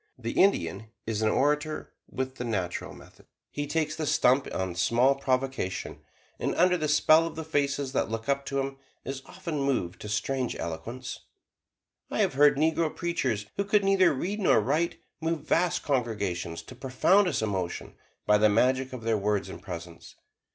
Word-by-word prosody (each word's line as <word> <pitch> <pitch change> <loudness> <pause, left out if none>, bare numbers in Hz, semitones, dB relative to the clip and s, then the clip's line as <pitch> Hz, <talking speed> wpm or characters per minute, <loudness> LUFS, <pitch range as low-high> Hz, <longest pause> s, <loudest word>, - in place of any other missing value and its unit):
The 115 -2 -4
Indian 190 - +2 0.2
is 110 -1 -2
an 110 - +3
orator 150 +5 0 0.2
with 130 0 -4
"the - - -3
natural 95 -7 -3
method"; - - -17 0.2
he 145 0 -3
takes 155 0 -1
the 155 -1 -3
stump 130 +1 +3
on 95 -1 -2
small 120 +10 +3
provocation, 130 -7 -2 0.4
and - - -1
under 180 +1 +4
the 155 -3 -1
spell 155 +2 +5
of 165 - -8
the 160 - -4
faces 140 -3 -1
that - - 0
look 115 +2 -4
up 140 0 +1
to 140 - -1
him, 135 0 -3 0.3
is 135 0 -4
often 165 -6 -4
moved 110 -11 -1
to 105 - -6
strange 125 +4 -1
eloquence. 120 +11 -5 0.9
I - - -3
have - - +2
heard 145 +1 +5
negro 160 +1 +1
preachers 140 -12 -1
who 200 - +1
could 205 0 +2
neither 195 -2 +4
read 185 +10 -2
nor 190 - +4
write, 150 +10 0 0.2
move 160 -1 -2
vast 175 0 +2
congregations 105 - -2
to - - -11
profoundest 135 - +2
emotion 95 -5 -3 0.3
by 105 0 +4
the 110 0 +5
magic 130 +4 +2
of 125 -3 -7
their 115 -2 +1
words 100 -1 0
and - - -9
presence. 85 -2 -9
135 Hz, 170 wpm, -28 LUFS, 110-155 Hz, 0.9 s, spell